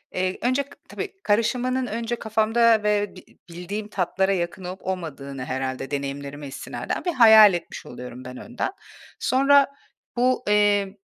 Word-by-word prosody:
ııı, 185 0 0
önce 255 +3 +1
k 280 - -23 0.2
tabii, 405 -1 -5
karışımının 250 +4 +1
önce 230 +1 -3
kafamda 220 0 +2
ve 205 -2 0
bi 185 - -12 0.3
bildiğim 195 +5 -5
tatlara 190 0 0
yakın 175 +1 -3
olup 180 +1 -7
olmadığını 140 -7 -5
herhâlde 130 +1 -4
deneyimlerime 140 +1 -5
istinaden 135 - -5
bir 350 - 0
hayal 220 - +8
etmiş 175 - -5
oluyorum 125 0 -9
ben 125 0 -8
önden. 240 - -4 0.5
Sonra 275 +2 +4 0.5
bu, 250 +1 +2
eee, 205 -1 +2
205 Hz, 140 wpm, -24 LUFS, 165-235 Hz, 0.5 s, hayal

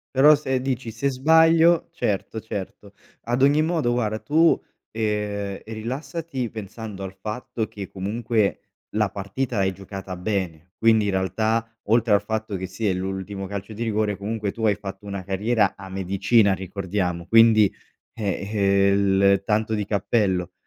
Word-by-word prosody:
Però 145 +3 +8
se 135 -3 -1
dici: 130 -2 -3
"Se 115 +5 -1
sbaglio" 160 +5 +4
certo, 110 - -2
certo. 100 -1 -7 0.3
Ad 120 +3 0
ogni 145 +3 +5
modo 160 -7 +1
guarda 110 -3 0
tu, 160 +6 +3 0.3
ehm, 105 -2 -2
rilassati 130 +4 -4
pensando 105 -1 -7
al 95 - -6
fatto 110 +1 -4
che 100 -3 -8
comunque 105 +2 -1 0.4
la 105 -2 +2
partita 105 +5 -3
l'hai 95 -1 +2
giocata 95 0 -8
bene, 90 -3 -3
quindi 110 -2 +4
in - - +1
realtà, 110 +5 0 0.2
oltre 115 -1 +4
al 100 - +3
fatto 110 -1 -3
che 95 - -4
sì, 95 +4 -4
è 95 - +1
l'ultimo 95 +1 -4
calcio 100 +2 -6
di 115 - -5
rigore 105 -2 0
comunque 105 +1 -3
tu 110 +3 -5
hai 105 -2 +3
fatto 100 -1 -8
una 100 -1 -5
carriera 100 +2 +1
a 95 -1 -10
medicina 100 +2 +2
ricordiamo, 90 -2 -3
quindi, 110 -2 +6 0.4
eh, 100 -2 -3
ehm, 100 -1 +3
il 100 0 +1
tanto 110 +1 0
di 105 - -1
cappello. 100 -3 0
105 Hz, 155 wpm, -24 LUFS, 95-115 Hz, 0.4 s, Però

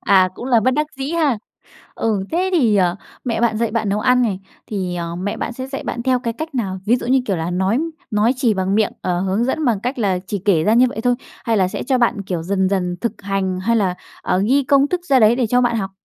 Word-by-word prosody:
À, 190 -2 +4
cũng - - -8
là 240 -3 +4
bất 255 - +2
đắc 300 +2 +1
dĩ 270 +2 -3
ha. 310 -8 +1 0.6
Ừ, 210 -4 -1
thế 365 +3 +1
thì, 240 - +3
ờ, 180 -2 +2 0.3
mẹ 230 -3 -1
bạn 235 -2 +2
dạy 230 -1 0
bạn 220 -1 -1
nấu 205 +2 0
ăn 250 +1 +3
này 200 -6 -1 0.3
thì, 185 -4 -3
à, 170 -1 -3 0.2
mẹ 205 +1 -2 0.2
sẽ 260 +1 -5
dạy 270 0 -5
bạn 235 - -3
theo 255 0 +2
cái 235 -2 -3
cách 315 +5 -6
nào? 195 -7 -2
Ví 235 +4 +4
dụ 240 - -6
như 260 +2 +3
kiểu 195 - 0
là 165 +1 -3
nói 190 +6 +1 0.3
nói 215 +3 +3
chỉ 245 -4 +2
bằng 190 0 0
miệng, 215 -1 +2
ờ, 175 -1 -1
hướng 195 +4 0
dẫn 305 +5 -1
bằng 230 -7 +1
cách 250 +4 -3
là 195 -5 +1
chỉ 205 - -2
kể 170 -6 +3
ra 215 - +3
như 250 +2 +6
vậy 245 - -5
thôi? 245 +2 +2 0.3
Hay 230 -2 +1
là 190 -3 +3
sẽ - - -4
cho 260 0 +1
bạn, 235 -3 +1
kiểu, 180 -4 -3
dần 190 +2 0
dần 180 -2 -1
thực 235 - -3
hành? 195 -2 -1
Hay 230 +5 +1
là, 190 -5 +1 0.3
ờ, 180 - +1
ghi 280 +3 +4
công 280 +2 +4
thức 360 +2 -1
ra 270 -5 +4
đấy 225 0 +5
để 250 -2 +1
cho 245 +3 +2
bạn 240 -2 +1
học? 195 -3 -2
220 Hz, 270 wpm, -19 LUFS, 195-250 Hz, 0.6 s, như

